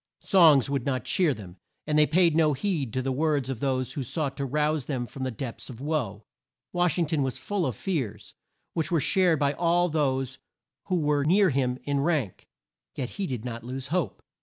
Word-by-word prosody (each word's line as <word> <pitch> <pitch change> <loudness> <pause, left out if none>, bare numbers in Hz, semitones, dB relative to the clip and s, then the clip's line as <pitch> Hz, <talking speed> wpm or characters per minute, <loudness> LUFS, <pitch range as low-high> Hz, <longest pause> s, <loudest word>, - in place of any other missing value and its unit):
Songs 160 - +6
would 140 -3 -1
not 130 -3 -1
cheer 175 -5 +2
them, 95 -7 -8 0.3
and 150 - -1
they 150 0 +5
paid 170 0 +3
no 155 -2 +4
heed 145 - -1
to 130 +3 -2
the 135 - -1
words 145 -1 0
of 125 - -5
those 130 -2 -1
who 145 - -3
sought 140 +2 -2
to 140 -1 -3
rouse 150 0 0
them 130 -4 -2
from 135 - -10
these 130 -2 -2
depths 120 0 -6
of 120 -3 -9
woe. 125 -9 -2 0.5
Wash 175 -1 +2
ing 170 - +2
ton 155 -1 0
was 130 -1 -1
full 180 +6 -1
of 125 - -3
fears, 125 - -3 0.4
which 160 -1 -1
were 170 - +2
shared 180 +2 +3
by 140 0 +1
all 175 +2 +2
those 135 -4 -1 0.5
who 185 - 0
were 150 -3 +1
near 185 +4 +4
him 125 -2 0
in 140 -1 0
rank, 140 - -1 0.5
yet 125 -3 -4
he 195 -2 -3
did 125 -4 -4
not 115 -2 -5
lose 130 +2 -6
hope. 175 -1 -2
140 Hz, 210 wpm, -27 LUFS, 130-160 Hz, 0.5 s, Songs